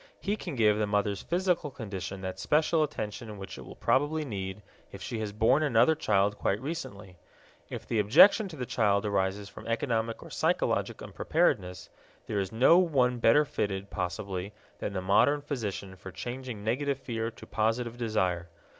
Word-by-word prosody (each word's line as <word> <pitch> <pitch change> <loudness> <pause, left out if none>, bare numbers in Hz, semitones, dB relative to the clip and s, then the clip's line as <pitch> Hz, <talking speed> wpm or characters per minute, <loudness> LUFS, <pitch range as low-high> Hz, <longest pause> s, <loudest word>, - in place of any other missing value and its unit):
He 205 +1 -1
can 175 -7 -6
give 105 -3 +3
the 105 - +1
mother's 100 -1 0
physical 175 -3 0
condition 95 -6 -6
that 95 -1 -5
special 155 +1 +2
attention 110 -7 -4
which 95 0 -8
it - - -8
will - - -11
probably 150 +3 +1
need 100 -4 -5 0.3
if 100 - -9
she 115 +1 -5
has 105 -2 -3
borne 110 +7 +3
another 145 +1 +4
child 105 -8 +1
quite 100 - 0
recently. 105 - -6 0.5
If - - -6
the 115 - 0
objection 195 - +6
to 175 - -9
the 130 -4 -4
child 105 -3 +1
arises 100 0 -1
from - - -11
economic 115 -1 -1
or - - -12
psychologic - - 0
unpreparedness, 90 -1 0 0.4
there 105 - -2
is 95 -1 -2
no 130 +10 +6
one 130 -8 +2
better 130 +7 +5
fitted, 100 -8 -3
possibly, 95 +1 -4 0.3
than - - -3
the 95 -1 -3
modern 140 +10 +4
physician 105 -9 -4
for 95 +1 -10
changing 120 -1 -6
negative 135 +5 0
fear 115 -4 -3
to 115 - -13
positive 115 +2 -1
desire. 95 -8 -1
110 Hz, 170 wpm, -29 LUFS, 100-135 Hz, 0.5 s, objection